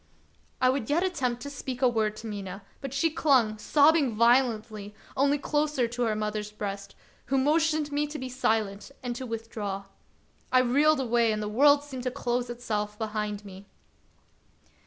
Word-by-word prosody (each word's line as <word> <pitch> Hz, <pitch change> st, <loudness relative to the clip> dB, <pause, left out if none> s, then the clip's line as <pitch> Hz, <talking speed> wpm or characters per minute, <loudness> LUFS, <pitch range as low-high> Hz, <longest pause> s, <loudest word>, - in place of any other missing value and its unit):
I 255 Hz, 0 st, +4 dB
would 260 Hz, -4 st, -3 dB
yet 325 Hz, +5 st, +2 dB
attempt 255 Hz, -10 st, -1 dB
to 285 Hz, -, -5 dB
speak 265 Hz, -2 st, -5 dB
a -, -, +7 dB
word 220 Hz, -3 st, 0 dB
to 220 Hz, -, -10 dB
Mina, 200 Hz, -2 st, -6 dB, 0.2 s
but 275 Hz, -2 st, -5 dB
she 275 Hz, +4 st, +1 dB
clung, 250 Hz, -9 st, +2 dB
sobbing 290 Hz, -1 st, +4 dB
violently, 225 Hz, -3 st, +2 dB, 0.2 s
only 280 Hz, +2 st, +3 dB
closer 295 Hz, -3 st, 0 dB
to 245 Hz, +1 st, -5 dB
her 220 Hz, -2 st, 0 dB
mother's 210 Hz, 0 st, -3 dB
breast, 200 Hz, -1 st, -6 dB, 0.3 s
who 270 Hz, +2 st, +1 dB
motioned 305 Hz, +2 st, +2 dB
me 295 Hz, +1 st, 0 dB
to 300 Hz, +1 st, -6 dB
be 260 Hz, -, -5 dB
silent 220 Hz, -5 st, -1 dB
and 245 Hz, -1 st, -3 dB
to 255 Hz, +1 st, -5 dB
withdraw. 220 Hz, -3 st, -4 dB, 0.7 s
I 255 Hz, -, +6 dB
reeled 285 Hz, +4 st, +3 dB
away, 235 Hz, -2 st, +2 dB
and 215 Hz, -, -1 dB
the 210 Hz, -, -3 dB
world 285 Hz, +6 st, +5 dB
seemed 265 Hz, -3 st, -7 dB
to 255 Hz, -, -1 dB
close 245 Hz, -1 st, -2 dB
itself 210 Hz, -3 st, -3 dB
behind 210 Hz, -1 st, -3 dB
me. 195 Hz, 0 st, -11 dB
240 Hz, 170 wpm, -28 LUFS, 215-280 Hz, 0.7 s, a